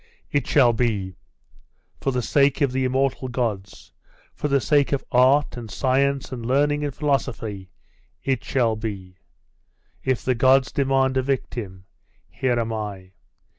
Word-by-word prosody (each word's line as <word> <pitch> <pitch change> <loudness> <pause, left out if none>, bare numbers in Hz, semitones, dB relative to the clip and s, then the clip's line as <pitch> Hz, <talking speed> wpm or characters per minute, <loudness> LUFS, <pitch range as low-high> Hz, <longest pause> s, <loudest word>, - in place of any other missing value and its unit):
'It 145 -3 0
shall 125 -5 +4
be. 105 -6 -1 0.8
For - - -1
the 125 -2 -1
sake 140 +1 +2
of 140 -3 +3
the 130 0 0
immortal 130 0 0
gods 110 -6 -4 0.4
for - - -3
the 140 -1 +2
sake 145 +1 +2
of 140 -2 -1
art, 135 +4 +4
and 120 -3 -8
science, 140 +2 0
and 125 -3 -6
learning, 145 +4 +1
and 145 - -1
philosophy.... 115 -9 -2 0.5
It 135 -1 -1
shall 120 -4 +1
be. 100 -5 -6 0.9
If 130 -2 -1
the 130 - +2
gods 130 +2 +3
demand 135 -1 +1
a - - +3
victim, 115 -8 -4 0.5
here 125 -2 0
am 115 -1 -2
I. 100 -4 -6
130 Hz, 145 wpm, -23 LUFS, 115-135 Hz, 0.9 s, shall